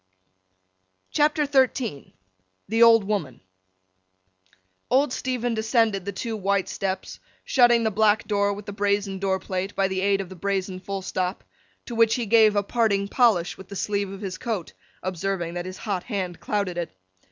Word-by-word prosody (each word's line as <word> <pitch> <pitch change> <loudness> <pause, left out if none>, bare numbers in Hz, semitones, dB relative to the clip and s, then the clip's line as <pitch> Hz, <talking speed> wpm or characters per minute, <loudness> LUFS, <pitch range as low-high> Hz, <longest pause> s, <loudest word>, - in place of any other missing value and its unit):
CHAPTER 300 0 +2
XII 260 - 0 0.5
THE 225 +3 0
OLD 230 -2 +7
WOMAN 195 - -3 1.5
OLD 265 0 +3
STEPHEN 245 -2 -2
descended 220 -3 +1
the 200 - -2
two 220 +4 -4
white 200 -2 0
steps, 190 -1 -4 0.2
shutting 240 -2 +4
the 220 - +1
black 215 +1 +2
door 200 -1 +1
with 200 0 -6
the 205 - -6
brazen 200 -1 0
door 190 -1 0
plate, 185 +1 -4
by 195 -1 +2
the 190 0 -2
aid 200 0 +2
of 190 -2 -5
the 190 - -9
brazen 190 0 -2
full 195 0 -5
stop, 185 0 -2 0.4
to 240 - -7
which 230 -1 +4
he 240 - -2
gave 220 -1 +5
a 205 - +2
parting 200 -3 +1
polish 195 -9 +2
with 190 - -11
the 200 - -7
sleeve 200 0 -1
of 195 +1 -8
his 190 -2 -5
coat, 215 -8 -4 0.3
observing 185 -1 -2
that 175 0 -4
his 185 - -7
hot 195 -4 -3
hand 185 -6 -3
clouded 200 -4 -2
it. 165 - -5
200 Hz, 170 wpm, -25 LUFS, 190-225 Hz, 1.5 s, OLD